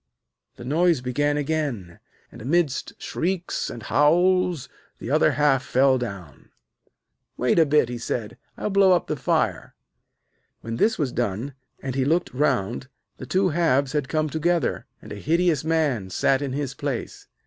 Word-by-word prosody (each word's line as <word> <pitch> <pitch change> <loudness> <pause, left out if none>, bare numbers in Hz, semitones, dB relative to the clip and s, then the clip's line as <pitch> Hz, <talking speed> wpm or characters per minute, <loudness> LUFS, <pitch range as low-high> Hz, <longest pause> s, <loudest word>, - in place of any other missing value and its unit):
The 120 - -10
noise 165 +3 +2
began 145 +4 0
again, 140 - -3 0.3
and, - - -12
amidst 150 +2 0
shrieks 180 +1 -2
and 115 - -8
howls, 175 - +2 0.3
the - - -6
other - - +4
half 145 -3 +2
fell 130 0 +3
down. 100 - -8 0.9
'Wait 125 +7 +2
a 160 - +5
bit,' 150 -3 +3
he 120 0 -5
said; 115 -2 -4 0.2
'I'll 210 - -3
blow 195 -1 +5
up 175 - +1
the 155 - -2
fire.' 135 - -1 0.9
When 115 +1 -5
this 220 - +2
was 145 -6 -1
done, 120 +4 -2 0.3
and 135 -1 -3
he 135 0 0
looked 165 +6 0
round, 125 -3 0 0.3
the - - -9
two 190 0 +2
halves 145 -5 +1
had 145 -3 -2
come 155 -1 0
together, 165 +3 -1 0.2
and - - -11
a 105 - -6
hideous 165 - +1
man 150 -11 0
sat 135 +8 +1
in 135 -2 -3
his 140 -2 -3
place. - - -5
145 Hz, 160 wpm, -24 LUFS, 125-165 Hz, 0.9 s, a